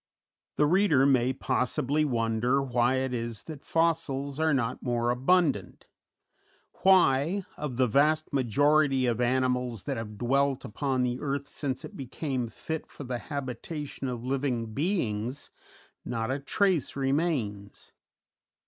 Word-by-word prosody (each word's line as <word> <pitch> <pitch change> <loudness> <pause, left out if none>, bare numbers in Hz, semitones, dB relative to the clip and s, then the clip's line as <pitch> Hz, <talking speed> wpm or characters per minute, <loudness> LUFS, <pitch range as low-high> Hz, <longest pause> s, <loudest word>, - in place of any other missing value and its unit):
The 150 - +3
reader 160 -5 +4
may 130 -2 +3
possibly 130 +3 0
wonder 120 0 +1
why 125 -1 +1
it 130 -1 -1
is 115 -2 -4
that 155 -4 -9
fossils 155 -4 0
are 160 0 +3
not 125 -4 0
more 120 -1 0
abundant; 135 - +1 1.0
why, 180 -1 +4
of 140 -5 -5
the 130 - +4
vast 150 +7 +2
majority 140 +2 +3
of 120 -1 0
animals 125 -2 0
that 140 -3 -3
have 105 -2 -6
dwelt 135 +3 +1
upon 130 +2 -1
the 125 0 -1
earth 140 -1 -2
since 135 -3 -3
it - - -11
became 130 -1 -3
fit 160 +8 -5
for - - -10
the 125 -2 -3
habitation 140 +1 -5
of 120 -2 -4
living 130 -4 -1
beings, 130 - -2 0.5
not 115 0 -2
a 135 - -1
trace 180 - +1
remains. 135 - -2
130 Hz, 130 wpm, -28 LUFS, 120-145 Hz, 1.0 s, reader